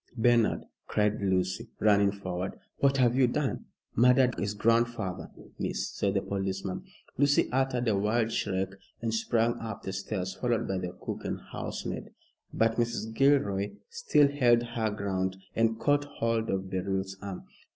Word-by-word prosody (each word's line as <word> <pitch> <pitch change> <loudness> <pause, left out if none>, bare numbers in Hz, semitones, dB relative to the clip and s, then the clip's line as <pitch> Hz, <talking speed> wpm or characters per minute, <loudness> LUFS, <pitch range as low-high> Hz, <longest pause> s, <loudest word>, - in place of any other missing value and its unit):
"Bernard," 120 -1 +3 0.2
cried 105 0 +1
Lucy, 95 +3 0
running 100 -2 +4
forward, 95 -2 -4 0.2
"what 135 0 +3
have 125 -2 +4
you 130 -1 +5
done?" 135 +2 -1 0.3
"Murdered 125 +1 +5
his 105 +1 -2
grandfather, 115 -4 +1 0.3
miss," - - -2
said - - -1
the - - +1
policeman. 95 -1 -3 0.4
Lucy 145 0 +4
uttered 125 -1 +1
a 110 - +3
wild 110 +3 +1
shriek 95 -3 -1 0.3
and 115 0 -2
sprang 115 +1 +2
up 110 -3 -6
the 95 - -4
stairs, 95 -1 -3
followed 120 -2 0
by 95 -1 -1
the 90 -1 -5
cook - - -4
and - - -3
housemaid. - - -5 0.4
But 115 0 +1
Mrs. 115 -2 -1
Gilroy 110 -7 +2 0.2
still 465 - +4
held 120 -4 +4
her 115 -2 -1
ground 95 -2 -2 0.2
and 115 0 +2
caught 145 +3 +2
hold 115 -5 -1
of 95 0 -2
Beryl's 95 +1 -2
arm. 100 -2 -6
110 Hz, 150 wpm, -29 LUFS, 95-120 Hz, 0.4 s, you